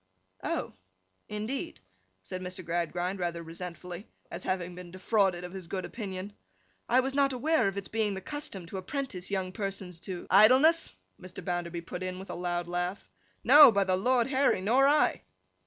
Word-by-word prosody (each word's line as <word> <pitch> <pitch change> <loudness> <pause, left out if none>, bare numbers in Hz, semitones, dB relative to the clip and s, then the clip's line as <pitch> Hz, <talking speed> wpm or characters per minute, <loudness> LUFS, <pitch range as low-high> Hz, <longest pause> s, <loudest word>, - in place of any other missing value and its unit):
'Oh! - - -2 0.6
Indeed?' 215 - -4 0.4
said 185 - -6
Mr. 185 0 -6
Gradgrind, 175 +3 -2
rather 170 -1 -2
resentfully, 175 +3 -8 0.2
as - - -5
having 180 -1 -2
been 180 0 -10
defrauded 185 -1 +1
of 180 0 -7
his 190 -3 -7
good 185 +1 -3
opinion. 200 -3 -6 0.6
'I 250 +2 +5
was 265 +1 -3
not 275 -1 +2
aware 305 0 +2
of 195 0 -3
its 200 - -4
being 215 -2 0
the - - -4
custom 250 - -5
to 180 +3 -7
apprentice 190 -3 -4
young 190 -2 -2
persons 195 -4 -4
to—' 180 0 -6
'Idleness,' 260 - +6 0.3
Mr. 185 -1 -9
Bounderby 175 -2 -3
put 180 +2 -7
in 185 0 -3
with 190 +1 -8
a - - -4
loud 175 0 -2
laugh. 180 +2 -3 0.4
'No, 285 +1 +9
by 200 -2 +2
the 185 -1 +1
Lord 240 +5 +2
Harry! 270 -5 +2
Nor 245 +8 +4
I! 295 +1 +3
190 Hz, 170 wpm, -29 LUFS, 180-230 Hz, 0.6 s, No